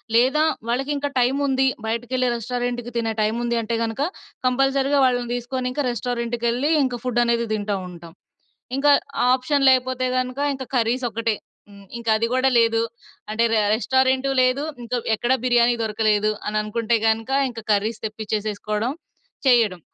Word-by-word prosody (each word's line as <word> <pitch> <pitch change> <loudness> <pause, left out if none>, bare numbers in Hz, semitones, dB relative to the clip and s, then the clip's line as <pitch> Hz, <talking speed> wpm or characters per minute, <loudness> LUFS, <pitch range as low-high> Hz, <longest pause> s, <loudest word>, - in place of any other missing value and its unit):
లేదా 265 +6 +4 0.3
"వాళ్ళకింకా 280 +3 -1
టైమ్ 255 +3 +2
ఉంది 265 0 +2 0.2
బయటికేళ్లి 245 +2 -1
రెస్టారెంట్‌కి 245 +1 -3
తినే 225 -1 -1
టైమ్ 220 +2 0
ఉంది" 235 0 0
అంటే 230 +1 -2
గనక 225 +4 -3 0.5
కంపల్సరీగా 270 +2 +2
వాళ్ళని 245 -2 0
తీసుకొనింకా 250 +3 -3
రెస్టారెంట్ 240 0 -3
కేళ్లి 250 +7 +1
ఇంకా 245 -3 -2
ఫుడ్ 240 -1 +1
అనేది 235 0 +1
తింటా 205 -1 -1
ఉంటాం. 170 -1 -12 0.6
ఇంకా 290 +1 +3 0.3
ఆ - - +3
ఆప్షన్ 275 +2 0
లేకపోతే 255 0 +1
గనక 255 +1 -3 0.2
ఇంకా 265 -1 -7
కర్రీస్ 245 +2 +1
ఒక్కటే. 230 +1 -1 0.4
హ్మ్. 200 -1 -15 0.2
ఇంకా 230 -1 -2
అది 230 +1 0
గూడా 255 +1 +3
లేదు 230 -1 +3 0.5
అంటే 225 +2 +1
ర - - +3 0.2
రెస్టారెంటు 260 +3 +1
లేదు, 255 +3 +2 0.2
ఇంకా 245 +1 -3 0.2
ఎక్కడ 240 +4 0
బిర్యానీ 240 -1 +4
దొరకలేదు, 215 -1 +1 0.2
అని 210 0 -2
అనుకుంటే 230 +2 0
గనక 225 +2 0 0.2
ఇంకా 230 -2 -8
కర్రీస్ 215 +2 0
తెప్పించేసేసుకోవడం, 215 +1 -3 0.5
చేయడం. 225 -8 +4
240 Hz, 145 wpm, -22 LUFS, 225-255 Hz, 0.6 s, లేదా